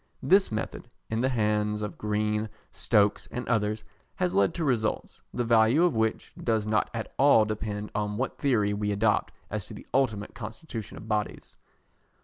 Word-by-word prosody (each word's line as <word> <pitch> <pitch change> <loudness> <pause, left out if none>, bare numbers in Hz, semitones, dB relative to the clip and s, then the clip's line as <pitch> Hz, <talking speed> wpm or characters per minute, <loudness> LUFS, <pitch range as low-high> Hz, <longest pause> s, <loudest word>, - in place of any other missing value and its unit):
This 195 -3 +4
method, 110 - -4 0.2
in 110 +1 0
the 130 - +2
hands 105 -3 0
of 100 -5 -4
Green, 105 +1 0 0.2
Stokes, 105 0 +2
and 125 - -5
others, 110 -2 0 0.3
has 90 - 0
led 100 0 +3
to 165 - -1
results, 115 -6 -1
the 120 - -1
value 115 +6 +4
of 175 -6 +3
which 110 0 -1
does 110 -3 +1
not 110 0 +1
at 115 -1 -5
all 135 -6 +6
depend 105 -1 -4
on 105 0 -2
what 130 +3 -3
theory 110 -8 +2
we 105 0 -1
adopt 105 +1 +1 0.2
as - - -3
to - - -9
the - - -11
ultimate 110 -6 +1
constitution 115 -1 -7
of 110 - -10
bodies. 105 -1 -3
110 Hz, 170 wpm, -28 LUFS, 105-120 Hz, 0.3 s, all